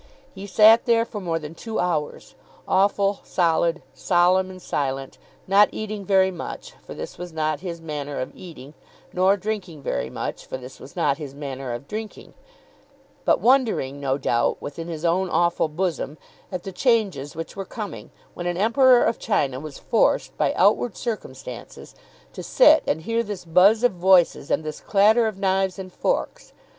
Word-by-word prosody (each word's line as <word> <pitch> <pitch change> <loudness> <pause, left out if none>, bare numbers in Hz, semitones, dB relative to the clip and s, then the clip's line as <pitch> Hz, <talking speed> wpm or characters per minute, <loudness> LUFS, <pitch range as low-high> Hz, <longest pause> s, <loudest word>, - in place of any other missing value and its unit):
He 195 0 -8
sat 220 +4 +6
there 230 -1 +3
for 210 -3 -7
more 170 -3 -1
than 155 -1 -7
two 220 +6 -6
hours, 165 -4 -2 0.3
awful, 200 +1 +2
solid, 170 -1 +1
solemn, 185 +1 +2
and 185 0 -10
silent, 135 -5 -3 0.3
not 200 +2 +5
eating 215 -2 -5
very 190 -1 +3
much, 345 - -8
for - - -10
this - - -8
was 180 -1 -7
not 155 -1 -1
his 175 -2 -6
manner 145 -3 -5
of 130 - -4
eating; 155 -6 -11 0.4
nor 190 +2 +3
drinking 190 -7 -5
very 65 - -2
much, - - -5
for - - -6
this 130 +1 -12
was 135 - -13
not 140 +1 +1
his 140 -3 -8
manner 135 -3 -6
of 120 +4 -6
drinking; 215 0 -7 0.9
but - - +3
wondering, 230 - +2
no 135 -1 -1
doubt, 120 -4 0
within 165 +4 -7
his 165 -1 -5
own 180 +2 +1
awful 170 -2 +1
bosom, 155 -2 -3 0.3
at 185 -2 -4
the 195 - -6
changes 195 - 0
which 165 +1 -7
were 195 - -4
coming 205 +1 -7 0.2
when 175 - -5
an 175 0 -2
Emperor 245 +5 +5
of - - 0
China 140 - 0
was 150 -1 -8
forced, - - +1
by - - +1
outward 205 +3 +2
circumstances, 135 - -7 0.4
to - - -7
sit - - +5
and 160 +2 -1
hear 230 +5 0
this 205 -5 -6
buzz 195 +7 +4
of 245 - +4
voices 180 -5 +3
and - - 0
this 155 -1 -6
clatter 220 +3 +3
of 215 -3 -4
knives 190 -1 0
and 185 -1 -8
forks. - - -2
180 Hz, 170 wpm, -23 LUFS, 150-205 Hz, 0.9 s, sat